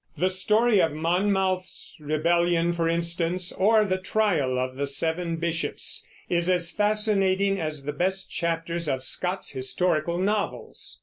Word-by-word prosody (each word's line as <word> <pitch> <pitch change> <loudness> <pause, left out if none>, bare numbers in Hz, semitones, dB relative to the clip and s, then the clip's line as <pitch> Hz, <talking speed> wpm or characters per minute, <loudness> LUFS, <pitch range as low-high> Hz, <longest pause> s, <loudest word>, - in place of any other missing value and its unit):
The 185 +1 +1
story 210 +3 +3
of 160 - +1
Monmouth's 185 +3 -1
rebellion, 170 +3 +1
for 165 -1 0
instance, 170 +1 -1
or 215 +2 +3
the 185 -2 -1
trial 185 -10 +1
of 130 0 -2
the 140 +1 -2
seven 165 +4 -1
bishops, 165 0 -2 0.2
is 175 0 0
as 175 -2 +1
fascinating 200 -2 +2
as 155 -3 -4
the 145 +1 -3
best 190 +5 -1
chapters 170 0 -2
of 130 -1 -1
Scott's 180 +6 -2
historical 155 +5 0
novels. 205 +3 -3
175 Hz, 135 wpm, -26 LUFS, 165-190 Hz, 0.2 s, story